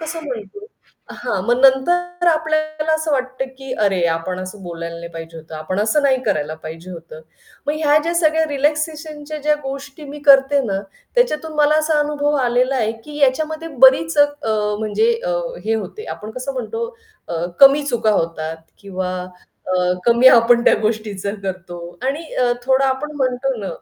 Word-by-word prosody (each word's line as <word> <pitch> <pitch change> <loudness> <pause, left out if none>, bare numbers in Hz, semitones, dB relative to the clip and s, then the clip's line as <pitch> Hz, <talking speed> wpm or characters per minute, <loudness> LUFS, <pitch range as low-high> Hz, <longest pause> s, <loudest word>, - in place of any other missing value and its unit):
कसं 320 +1 -5
म्हणतो 255 - -7 0.4
हां, 240 -6 -3
मग 245 +1 +2
नंतर 350 +7 +3
आपल्याला 310 -1 0
असं 315 -1 -1
वाटतं, 260 0 -1
की 270 -1 -6
अरे 190 -3 +1
आपण 180 +3 -5
असं 185 +2 -8
बोलायला 170 -1 -6
नाही 170 0 -8
पाहिजे 165 0 -8
होतं, 160 0 -10
आपण 185 +6 -3
असं 285 +8 +2
नाही 260 -2 +2
करायला 155 -7 -1
पाहिजे 165 +3 -8
होतं. 165 -2 -10 0.5
मग 295 - +1
ह्या 300 -1 +3
ज्या 335 +2 -2
सगळ्या 320 -1 +3
रिलॅक्सेशनच्या 300 +1 -2
ज्या 300 0 +3
गोष्टी 275 +2 -7
मी 290 +1 -8
करते 275 +1 +6
ना, 195 -3 -1 0.3
त्याच्यातून 320 -11 +1
मला 300 0 +4
असा 310 -1 +1
अनुभव 295 0 0
आलेला 250 +2 +1
आहे, 220 -2 0
की 295 -1 -9
याच्यामध्ये 310 +4 0 0.2
बरीच 315 +4 +3
अ, 290 - +8 0.5
म्हणजे 220 - +1
अ, - - 0 0.3
हे 225 +1 +1
होते, 220 - -5
आपण 215 +1 -9
कसं 255 +4 -5
म्हणतो 455 - -4 0.4
अ, 170 0 -2 0.2
कमी 275 +1 +8
चुका 230 -5 +1
होतात 165 -4 -1 0.2
किंवा 185 -2 -4 0.6
अ, 180 -1 +2
कमी 235 +2 +4
आपण 235 0 +5
त्या - - +6
गोष्टीचं 210 -2 -2
करतो 185 -2 -6 0.3
आणि 290 +5 -1
अ, 245 -1 +2
थोडा 265 +1 +3
आपण 275 +3 -2
म्हणतो 260 0 0
ना, 195 - -4
265 Hz, 165 wpm, -19 LUFS, 200-300 Hz, 0.6 s, अ